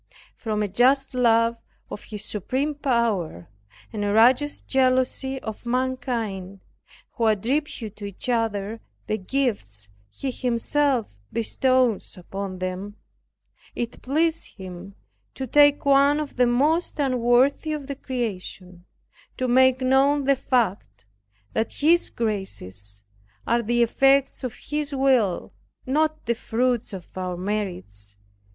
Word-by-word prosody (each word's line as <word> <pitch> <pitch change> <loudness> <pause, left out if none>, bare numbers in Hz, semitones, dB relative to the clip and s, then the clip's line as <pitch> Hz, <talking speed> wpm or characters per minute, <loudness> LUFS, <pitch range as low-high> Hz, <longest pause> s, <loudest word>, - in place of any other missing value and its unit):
From 215 -2 -2
a - - 0
just 260 +7 +3
love 230 -2 +3 0.3
of 205 - -7
His 210 -1 -6
supreme 260 +9 -1
power, 230 - -1 0.5
and 210 -2 -2
a 205 - 0
righteous 250 +7 +4
jealousy 265 0 +1
of 220 -1 -6
mankind, 235 -7 -2 0.5
who 230 - 0
attribute 225 0 -1
to 205 - -7
each 200 +4 -5
other 225 -2 -1 0.2
the 215 - -2
gifts 185 - -2 0.2
He 265 - -4
Himself 250 - 0
bestows 250 -2 +1
upon 190 +1 -6
them, 185 +3 -4 0.8
it 240 0 -4
pleased 320 +5 0
Him 190 0 -9 0.4
to 265 - -4
take 290 +3 +4
one 280 +1 +5
of 300 -2 -5
the 250 -1 +4
most 300 +10 +1
unworthy 260 +2 +2
of 300 -2 -3
the 280 - -4
creation, 190 -8 -5 0.5
to 255 - -1
make 260 +1 +4
known 270 +2 +3
the 275 +1 +3
fact 235 - -1 0.5
that 220 0 -1
His 335 +4 +3
graces 100 - -4 0.4
are 235 +1 +2
the 240 +1 +2
effects 270 +4 +3
of 250 -3 -4
His 295 -1 -3
will, 255 -9 +2 0.3
not 310 +3 0
the 235 - +2
fruits 240 +1 -1
of 185 -3 -9
our 180 -1 -3
merits. 105 - -4
240 Hz, 125 wpm, -24 LUFS, 200-270 Hz, 0.8 s, one